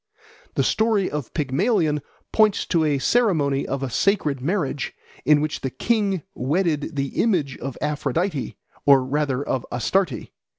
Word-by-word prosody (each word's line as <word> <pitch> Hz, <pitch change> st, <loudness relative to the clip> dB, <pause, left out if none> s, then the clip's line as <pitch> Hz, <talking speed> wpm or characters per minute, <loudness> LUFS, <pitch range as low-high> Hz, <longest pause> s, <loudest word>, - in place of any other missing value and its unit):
The -, -, +2 dB
story 220 Hz, -3 st, +2 dB
of 145 Hz, -5 st, -4 dB
Pygmalion 155 Hz, -, +1 dB, 0.3 s
points 215 Hz, -2 st, +3 dB
to 165 Hz, -3 st, +1 dB
a 150 Hz, -2 st, +2 dB
ceremony 150 Hz, -, +2 dB
of 135 Hz, 0 st, -2 dB
a 135 Hz, -, -2 dB
sacred 150 Hz, -, +1 dB
marriage 145 Hz, -3 st, -2 dB, 0.3 s
in 150 Hz, -1 st, +5 dB
which 155 Hz, 0 st, -2 dB
the 135 Hz, -, -2 dB
king 195 Hz, -, 0 dB
wedded 155 Hz, +2 st, -1 dB
the 140 Hz, -1 st, -1 dB
image 165 Hz, -, +1 dB
of 135 Hz, -1 st, -5 dB
Aphrodite, 150 Hz, +1 st, -1 dB, 0.3 s
or 135 Hz, -2 st, +6 dB
rather 140 Hz, -1 st, 0 dB
of 130 Hz, -, -1 dB
Astarte. 130 Hz, -, 0 dB
150 Hz, 140 wpm, -23 LUFS, 135-190 Hz, 0.3 s, or